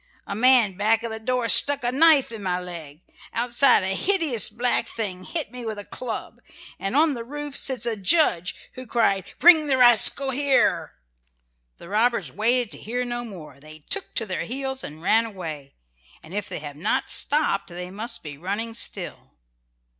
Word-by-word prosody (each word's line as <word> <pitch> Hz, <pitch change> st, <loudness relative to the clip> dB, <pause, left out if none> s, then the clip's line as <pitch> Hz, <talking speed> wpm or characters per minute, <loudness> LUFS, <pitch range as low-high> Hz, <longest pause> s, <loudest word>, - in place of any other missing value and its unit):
A -, -, -5 dB
man 235 Hz, -2 st, +4 dB
back 215 Hz, +4 st, +1 dB
of 230 Hz, -, -4 dB
the 220 Hz, -, -5 dB
door 250 Hz, +1 st, -2 dB
stuck 280 Hz, +4 st, +6 dB
a 240 Hz, -, 0 dB
knife 285 Hz, -2 st, +4 dB
in 225 Hz, -2 st, -8 dB
my 180 Hz, -2 st, -2 dB
leg. 170 Hz, -4 st, -9 dB, 0.3 s
Outside 240 Hz, 0 st, +3 dB
a 190 Hz, +1 st, -1 dB
hideous 320 Hz, -, +2 dB
black 240 Hz, +3 st, +1 dB
thing 185 Hz, -5 st, -5 dB
hit 320 Hz, -, -1 dB
me 250 Hz, -1 st, -8 dB
with 220 Hz, -2 st, -5 dB
a 205 Hz, -, -7 dB
club, 240 Hz, -3 st, -7 dB, 0.4 s
and 195 Hz, +5 st, -4 dB
on 305 Hz, +1 st, +3 dB
the 235 Hz, -3 st, -6 dB
roof 290 Hz, +3 st, -7 dB
sits 260 Hz, -3 st, -1 dB
a 230 Hz, -2 st, -1 dB
judge 200 Hz, -, +2 dB, 0.2 s
who 255 Hz, 0 st, -10 dB
cried, 195 Hz, -5 st, +1 dB
'Bring 320 Hz, -3 st, +6 dB
the 270 Hz, -2 st, +1 dB
rascal 250 Hz, +2 st, +5 dB
here!'" 275 Hz, +1 st, +1 dB, 0.8 s
The -, -, -13 dB
robbers 230 Hz, +5 st, 0 dB
waited 240 Hz, +3 st, 0 dB
to -, -, -8 dB
hear 245 Hz, +3 st, -4 dB
no 240 Hz, 0 st, -4 dB
more; 165 Hz, -, -11 dB
they 155 Hz, +1 st, -15 dB
took 400 Hz, -, -1 dB
to 225 Hz, -, 0 dB
their 185 Hz, -5 st, -4 dB
heels 265 Hz, +4 st, -5 dB
and 155 Hz, +2 st, -10 dB
ran 225 Hz, +5 st, +3 dB
away, 160 Hz, -10 st, -8 dB, 0.5 s
and 160 Hz, +2 st, -13 dB
if 205 Hz, -1 st, -4 dB
they -, -, -5 dB
have 145 Hz, -1 st, -9 dB
not 160 Hz, -, -1 dB
stopped 295 Hz, -9 st, 0 dB
they 180 Hz, +1 st, -8 dB
must 205 Hz, -3 st, -5 dB
be 145 Hz, -3 st, -8 dB
running 205 Hz, +6 st, -4 dB
still. 230 Hz, -, -3 dB
230 Hz, 185 wpm, -23 LUFS, 185-255 Hz, 0.8 s, stuck